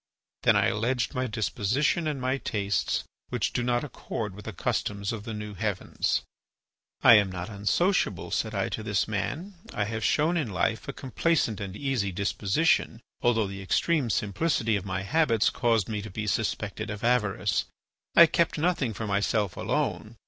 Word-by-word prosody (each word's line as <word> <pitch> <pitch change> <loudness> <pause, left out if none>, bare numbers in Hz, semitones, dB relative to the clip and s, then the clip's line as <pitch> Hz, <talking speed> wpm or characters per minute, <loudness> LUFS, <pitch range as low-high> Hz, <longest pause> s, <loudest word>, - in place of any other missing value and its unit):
Then - - +4
I - - +4
alleged 120 +5 0
my 130 -1 -1
disposition 120 - 0
and 150 -3 -2
my 130 +2 0
tastes, 100 -6 -1 0.3
which - - -1
do - - 0
not 120 0 +1
accord 110 -7 -5
with 105 +2 -11
the 110 - -4
customs 100 +2 -2
of 105 -2 -6
the 115 - -4
new 105 0 -6
heavens. 100 0 -1 0.8
"'I - - +10
am 100 -2 +2
not 90 +3 -5
unsociable,' 165 - +1
said 110 -1 -1
I 100 - 0
to - - -4
this 105 -3 0
man. 150 - -3 0.2
'I 105 - +1
have 110 +1 -3
shown 155 +8 +2
in 145 -9 -1
life 100 +5 -1
a - - -2
complaisant 135 - 0
and 100 0 -5
easy 130 -8 -1
disposition, 100 - +1 0.2
although 115 -3 +3
the 100 0 -6
extreme 140 - +1
simplicity 115 +2 +1
of 100 -1 -3
my 95 0 -2
habits 115 -3 +2
caused 115 -5 +1
me 105 -2 -3
to 110 - -7
be 105 +3 -4
suspected 105 - -2
of 105 0 -6
avarice. 105 -5 +1 0.5
I 170 - +10
kept 165 +1 +1
nothing 150 - 0
for 110 - -4
myself 100 -1 0
alone. - - -2
110 Hz, 170 wpm, -27 LUFS, 100-130 Hz, 0.8 s, I